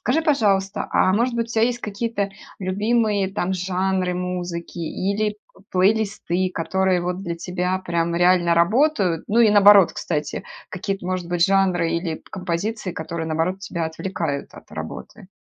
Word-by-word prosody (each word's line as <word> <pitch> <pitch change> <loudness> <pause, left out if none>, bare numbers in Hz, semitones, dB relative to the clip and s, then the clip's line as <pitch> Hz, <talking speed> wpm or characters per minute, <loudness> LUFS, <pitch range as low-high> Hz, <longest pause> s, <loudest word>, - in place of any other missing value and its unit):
Скажи, 280 +6 +1
пожалуйста, 205 - +1
а 185 - +3
может 235 +3 +1
быть 230 0 -1
у 235 - -8
тя 220 - +3
есть 240 0 +1
какие-то 210 -1 -2 0.3
любимые 205 +1 0
там 190 -2 -1
жанры 185 0 0
музыки 180 -1 -4
или 205 +5 -2 0.3
плейлисты, 185 -2 +1
которые 190 +2 +1
вот 180 +2 -3
для 170 -2 -4
тебя 180 +1 -2
прям 170 -2 -1
реально 175 0 +4
работают? 195 - +2
Ну 220 - +2
и, 225 - +6
наоборот, 205 -2 +7
кстати, 150 -1 -3 0.2
какие-то 195 0 -4
может 185 -1 -2
быть 175 0 +2
жанры 185 -4 +2
или 170 -2 -2
композиции, 185 +2 -3
которые 165 0 -5
наоборот 165 +4 -1
тебя 170 -4 -3
отвлекают 160 -3 -4
от - - -15
работы? - - -8
185 Hz, 150 wpm, -22 LUFS, 175-205 Hz, 0.3 s, наоборот